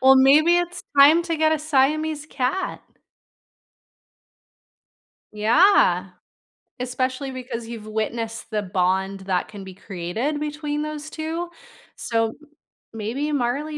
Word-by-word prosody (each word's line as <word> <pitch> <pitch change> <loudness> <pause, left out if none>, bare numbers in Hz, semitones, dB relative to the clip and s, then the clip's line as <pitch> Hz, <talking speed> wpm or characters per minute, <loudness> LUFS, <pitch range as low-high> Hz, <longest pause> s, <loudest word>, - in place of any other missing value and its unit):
well, 265 +1 +7
maybe 300 +6 +6
it's 350 0 -2
time 300 +5 +7
to 330 -2 -1
get 315 0 +3
a 315 - +2
Siamese 305 +1 +1
cat. 285 +6 -2 2.5
Yeah. 215 - +4 0.7
Especially 255 +2 -2
because 245 -3 -6
you've 225 -2 -8
witnessed 225 +1 -3
the 215 -2 -1
bond 190 +1 0
that 190 -1 -1
can 205 -2 -10
be 190 - -9
created 200 - -3
between 295 0 -3
those 305 0 -5
2, 325 +2 -4 0.5
so 225 -1 -1 0.6
maybe 235 +8 -3
Marley 285 +3 -1
265 Hz, 115 wpm, -23 LUFS, 220-305 Hz, 2.5 s, well